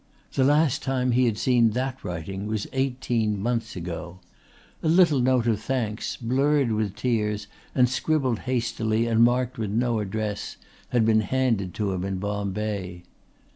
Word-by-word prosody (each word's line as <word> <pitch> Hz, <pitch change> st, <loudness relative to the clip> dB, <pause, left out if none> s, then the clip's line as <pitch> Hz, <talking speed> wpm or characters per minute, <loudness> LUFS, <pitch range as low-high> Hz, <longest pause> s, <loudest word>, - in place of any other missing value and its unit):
The 135 Hz, -, +2 dB
last 145 Hz, 0 st, +3 dB
time 130 Hz, -2 st, 0 dB
he 125 Hz, +1 st, +3 dB
had 110 Hz, -2 st, 0 dB
seen 120 Hz, -3 st, +3 dB
that 130 Hz, 0 st, -3 dB
writing 95 Hz, +4 st, -5 dB
was 105 Hz, -1 st, -2 dB
eighteen 125 Hz, -5 st, 0 dB
months 115 Hz, +2 st, -2 dB
ago. 90 Hz, 0 st, -6 dB, 0.6 s
A -, -, -1 dB
little 165 Hz, -4 st, +5 dB
note 125 Hz, -1 st, +2 dB
of 110 Hz, -3 st, +1 dB
thanks, 115 Hz, -5 st, -2 dB
blurred 135 Hz, +2 st, +2 dB
with 105 Hz, -2 st, -1 dB
tears 105 Hz, -3 st, -1 dB, 0.3 s
and 125 Hz, -1 st, +5 dB
scribbled 130 Hz, -1 st, 0 dB
hastily 115 Hz, -2 st, 0 dB
and 115 Hz, 0 st, +3 dB
marked 125 Hz, 0 st, +1 dB
with 110 Hz, -3 st, -2 dB
no 115 Hz, +2 st, +1 dB
address, 105 Hz, 0 st, -3 dB, 0.3 s
had 120 Hz, -3 st, +2 dB
been 110 Hz, -1 st, +4 dB
handed 110 Hz, -5 st, 0 dB
to 105 Hz, -2 st, -1 dB
him 90 Hz, -1 st, -2 dB
in 95 Hz, -1 st, -2 dB
Bombay. 100 Hz, -2 st, -3 dB
115 Hz, 155 wpm, -25 LUFS, 105-130 Hz, 0.6 s, little